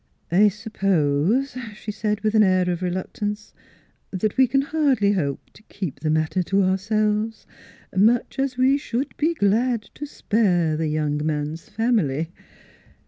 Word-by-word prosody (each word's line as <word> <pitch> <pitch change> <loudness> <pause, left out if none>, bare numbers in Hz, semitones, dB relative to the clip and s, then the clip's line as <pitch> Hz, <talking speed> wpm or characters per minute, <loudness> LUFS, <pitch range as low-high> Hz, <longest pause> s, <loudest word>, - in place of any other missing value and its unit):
" - - -39
I 200 +5 +5
suppose," 195 - 0 0.2
she 210 - -6
said, 210 0 -2
with 215 0 0
an 215 - +5
air 185 -2 +3
of 175 - -2
reluct 185 +3 -4
ance, 210 0 -3 0.6
u 190 - -3
that 210 +2 -1
we 260 -1 +5
can 270 +3 +1
hardly 275 -9 +2
hope 145 -9 -2
to - - -18
keep 185 -9 -5
the 155 - -2
matter 155 +4 +1
to 195 +2 +1
ourselves 210 +3 0 0.5
much 225 +7 +2
as 270 -2 -1
we 265 +2 +3
should 265 -1 -3
be 325 +3 +1
g - - +2
lad 230 +3 +2
to 295 - -7
spare 180 - +1
the 160 0 -1
young 150 -1 -1
man's 150 +1 -3
family. 205 - 0
205 Hz, 165 wpm, -23 LUFS, 170-225 Hz, 0.6 s, I